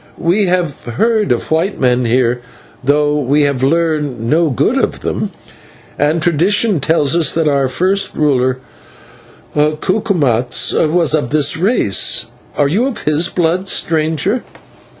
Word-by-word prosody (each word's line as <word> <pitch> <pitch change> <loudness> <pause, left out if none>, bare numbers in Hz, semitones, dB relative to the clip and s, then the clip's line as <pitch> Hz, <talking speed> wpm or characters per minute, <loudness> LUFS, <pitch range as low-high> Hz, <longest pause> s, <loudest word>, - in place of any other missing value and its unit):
"We 185 +4 +1
have 175 -5 -2
heard 215 - 0
of 120 - -2
white 170 +6 0
men 125 -1 +1
here, 120 +1 +1 0.4
though 145 +2 +1
we 145 +2 +1
have 140 -3 -1
learned 150 -3 0
no 160 +4 +2
good 130 - 0
of - - -2
them, - - -3 0.7
and 150 +3 +1
tradition 185 +4 +2
tells 150 0 +1
us 170 -2 +2
that 165 -1 +1
our 140 -2 +1
first 190 +8 0
ruler, 130 -4 +1 1.0
Cucumatz, 150 - 0
was 160 -1 +2
of 145 -6 0
this 145 -1 +2
race. 180 - +1 0.3
Are 145 - +2
you 210 - 0
of 270 - -5
his 155 +3 +1
blood, 180 +2 -1
stranger?" 160 - 0
155 Hz, 135 wpm, -15 LUFS, 140-175 Hz, 1.0 s, no